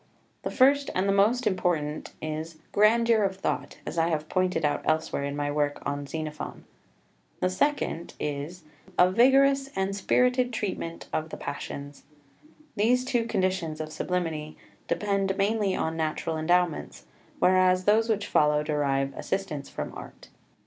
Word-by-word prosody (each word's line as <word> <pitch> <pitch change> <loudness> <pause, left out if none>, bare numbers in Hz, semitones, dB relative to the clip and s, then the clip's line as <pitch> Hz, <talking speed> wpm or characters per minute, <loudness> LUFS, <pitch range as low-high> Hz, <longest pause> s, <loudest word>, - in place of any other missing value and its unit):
The - - -3
first 275 +2 +4
and 185 +2 +1
the - - +3
most 225 +5 +3
important 175 -6 -1
is 155 +1 -4
(1) 155 - -25
grandeur 225 +2 +4
of 195 -2 0
thought, 190 - -3
as 170 - -3
I 165 - +3
have 155 -2 -1
pointed 180 -4 +1
out 145 -1 0
elsewhere 155 -2 0
in 140 0 -3
my 145 0 -1
work 145 0 0
on 145 0 -3
Xenophon. 155 0 -5 0.8
The 185 - +1
second 190 - -1
is 150 +5 -4 0.3
(2) 190 - -20
a 180 +1 +5
vigorous 270 +4 +4
and 195 +1 -1
spirited 250 +5 +2
treatment 185 -6 -4
of 155 +1 -1
the - - -7
passions. 140 0 -6 0.7
These 245 +4 +2
two 245 -3 +1
conditions 185 -6 -1
of 155 0 -5
sublimity 160 -4 -3 0.3
depend 195 -2 0
mainly 205 -1 +1
on 160 0 -1
natural 160 0 -1
endowments, 175 +1 0 0.3
whereas 185 0 +4
those 220 +2 +4
which 210 -2 +1
follow 150 0 +3
derive 140 -2 0
assistance 165 -8 -3
from - - -5
Art. - - -11
180 Hz, 150 wpm, -27 LUFS, 155-210 Hz, 0.8 s, a